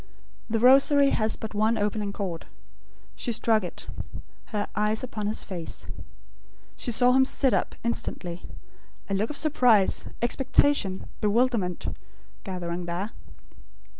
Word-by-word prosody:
The 225 0 +1
Rosary 275 +3 +6
has 215 -1 +1
but 220 - -7
one 215 +2 +2
opening 205 -1 -1
chord. 185 -5 -5 0.7
She 240 - -2
struck 225 -2 +2
it; 180 - -7 0.6
her 210 -2 -3
eyes 210 +2 0
upon 215 -5 -4
his 215 - -1
face. 175 -4 -6 0.9
She 245 - -2
saw 245 +2 +4
him 265 +1 +5
sit 265 -2 +2
up, - - 0
instantly; 180 -6 -3 0.7
a - - +1
look 205 +3 0
of 300 - -3
surprise, 245 -10 +3
expectation, 260 -4 +1
bewilderment, 210 -4 +1 0.5
gathering 175 -2 -4
there. 180 +6 -3
215 Hz, 125 wpm, -26 LUFS, 195-245 Hz, 0.9 s, Rosary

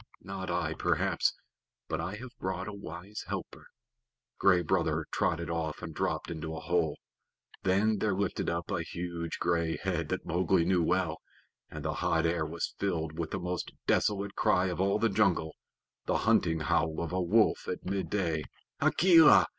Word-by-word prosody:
"Not 95 -1 -5
I, 85 -2 0
perhaps - - +1 0.5
but 80 0 -2
I 90 +5 -3
have 125 +3 -10
brought 95 0 -3
a 105 - -5
wise 100 +1 -8
helper." - - -6 0.7
Gray 90 -3 +5
Brother 75 - +1
trotted 85 0 0
off 80 0 -3
and 80 -2 -5
dropped - - -2
into 80 -1 -5
a - - -4
hole. 85 -3 0 0.6
Then 100 +3 +2
there 105 -2 +1
lifted 100 -1 -1
up 85 +3 -3
a 90 -4 0
huge 85 0 -4
gray 85 -1 0
head 85 -5 -2
that - - -2
Mowgli 90 0 +2
knew 90 -1 +3
well, 85 -1 +1 0.5
and - - -7
the - - 0
hot 80 0 +2
air 80 -2 +1
was 85 +2 -3
filled 80 -5 -2
with 80 -2 -2
the - - -2
most 90 0 -3
desolate 100 -1 +1
cry 90 +1 +2
of 90 +1 -2
all 100 +1 +2
the 115 - +2
jungle 95 -6 +2 0.5
the - - +2
hunting 80 -2 +3
howl 80 +1 +1
of 85 0 -3
a 95 - +1
wolf 105 +5 +3
at - - -4
midday. 95 -4 -1 0.4
"Akela! 165 -4 +7
90 Hz, 170 wpm, -30 LUFS, 80-95 Hz, 0.7 s, Akela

